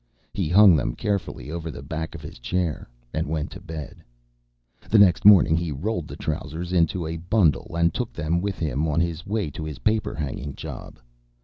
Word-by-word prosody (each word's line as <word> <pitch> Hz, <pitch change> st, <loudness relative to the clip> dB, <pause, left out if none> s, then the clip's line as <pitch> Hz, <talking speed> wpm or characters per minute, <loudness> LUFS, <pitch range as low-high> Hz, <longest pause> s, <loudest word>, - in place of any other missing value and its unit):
He -, -, -1 dB
hung 95 Hz, 0 st, +7 dB
them 65 Hz, -5 st, -1 dB
carefully 100 Hz, -7 st, -3 dB
over 85 Hz, -1 st, -4 dB
the 70 Hz, -, -8 dB
back 80 Hz, +4 st, -5 dB
of 75 Hz, -, -9 dB
his 75 Hz, -, -9 dB
chair, 85 Hz, +2 st, -2 dB, 0.2 s
and -, -, -1 dB
went 80 Hz, +1 st, -2 dB
to 95 Hz, -, -9 dB
bed. 80 Hz, -6 st, -8 dB, 0.9 s
The 110 Hz, -, +5 dB
next 100 Hz, -2 st, +5 dB
morning 95 Hz, -6 st, +8 dB
he 85 Hz, -1 st, -1 dB
rolled 85 Hz, +4 st, -3 dB
the -, -, -8 dB
trousers 80 Hz, +3 st, -4 dB
in 85 Hz, -2 st, +4 dB, 0.2 s
a 80 Hz, +1 st, -3 dB
bundle 85 Hz, -2 st, +1 dB
and 85 Hz, 0 st, +3 dB
took 125 Hz, -3 st, -3 dB
them 85 Hz, +2 st, -1 dB
with 100 Hz, 0 st, -2 dB
him 75 Hz, -1 st, -1 dB
on 75 Hz, +1 st, +1 dB
his 85 Hz, -1 st, -2 dB
way 100 Hz, -6 st, -1 dB
to 80 Hz, -, -6 dB
his 75 Hz, -3 st, -5 dB
paper 110 Hz, 0 st, +1 dB
hanging 70 Hz, -2 st, -4 dB
job. -, -, -8 dB
85 Hz, 195 wpm, -24 LUFS, 75-95 Hz, 0.9 s, morning